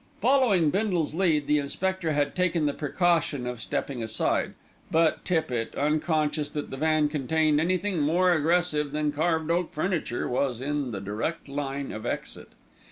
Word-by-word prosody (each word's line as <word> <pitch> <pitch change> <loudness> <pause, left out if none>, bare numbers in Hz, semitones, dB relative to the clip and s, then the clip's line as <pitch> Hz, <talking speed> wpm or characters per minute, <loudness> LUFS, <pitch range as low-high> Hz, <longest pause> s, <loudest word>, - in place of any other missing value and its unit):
Following 220 - +3
Bindle's 185 -6 0
lead 160 -4 +2
the 150 +1 +3
inspector 180 +4 -2
had 145 -1 0
taken 180 -3 +1
the 145 - +1
precaution 155 -3 0
of 125 -2 -5
stepping 130 +1 -3
aside; 110 -1 0 0.3
but 160 0 +2
Tippitt, 155 -10 -1
unconscious 150 0 0
that 150 - -5
the 135 - -5
van 155 0 +2
contained 150 +1 +1
anything 185 +2 0
more 175 +5 +3
aggressive 155 -2 +1
than 150 0 0
carved 160 +1 0
oak 175 0 0
furniture, 155 -6 -1
was 125 -1 -1
in 145 0 -2
the 100 -4 -5
direct 110 +13 -3
line 140 0 -4
of 110 - -6
exit. - - -5
155 Hz, 155 wpm, -27 LUFS, 140-170 Hz, 0.3 s, Following